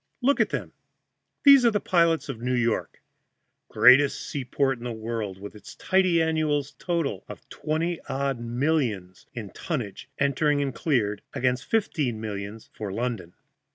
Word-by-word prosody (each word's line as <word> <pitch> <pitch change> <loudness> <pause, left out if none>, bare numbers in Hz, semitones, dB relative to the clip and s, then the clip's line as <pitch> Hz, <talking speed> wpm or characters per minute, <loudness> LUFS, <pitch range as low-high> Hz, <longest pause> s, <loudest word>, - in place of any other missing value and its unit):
Look 270 +3 +2
at - - +3
them! - - -4 0.7
These 280 -2 +8
are 235 - +6
the 210 -2 0
pilots 170 -4 +2
of 125 -5 -6
New 125 +1 0
York, 120 -2 -1 0.7
greatest 135 +3 +6
seaport 135 -1 -1
in - - -11
the 120 - -3
world, 110 -3 -4
with 100 +1 -8
its 105 - -12
tidy 185 -3 +2
annual 155 -3 +1 0.2
total 165 - -2
of - - -10
twenty 165 +2 -2
odd 135 -1 -1
millions 120 - -1
in 110 -5 -6
tonnage 125 - -5
entered 145 +1 +2
and 140 -2 -1
cleared, 105 -9 0
against 125 -1 0
fifteen 150 - 0
millions 105 0 -6
for 105 -3 -5
London. 110 -5 -3
130 Hz, 150 wpm, -26 LUFS, 110-160 Hz, 0.7 s, These